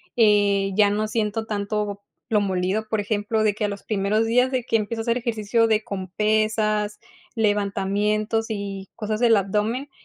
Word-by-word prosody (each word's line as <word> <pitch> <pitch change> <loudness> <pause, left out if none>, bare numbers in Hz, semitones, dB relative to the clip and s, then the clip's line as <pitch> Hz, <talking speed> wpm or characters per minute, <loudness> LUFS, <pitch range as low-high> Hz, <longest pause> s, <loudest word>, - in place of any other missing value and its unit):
eh, 205 -3 +3
ya 205 0 +5
no 210 +1 0
siento 220 0 -1
tanto 205 -1 -3 0.3
lo 210 -2 +3
molido, 195 +2 -1
por 220 - 0
ejemplo, 210 +1 -1
de 210 -1 +3
que, 210 +1 -2
a - - +1
los 200 -1 -6
primeros 210 +1 0
días, 250 +3 +3
de 255 -2 -1
que 230 - +1
empiezo 225 +1 -3
a - - -4
hacer 235 +1 +1
ejercicio, 230 -1 +1
de 220 -1 +2
con 190 -3 -5
pesas, 215 0 0 0.4
levantamientos 210 +1 0
y 200 -2 -5
cosas 215 -1 -3
del 230 -3 +5
abdomen, 210 +8 -1
210 Hz, 175 wpm, -23 LUFS, 205-225 Hz, 0.4 s, ya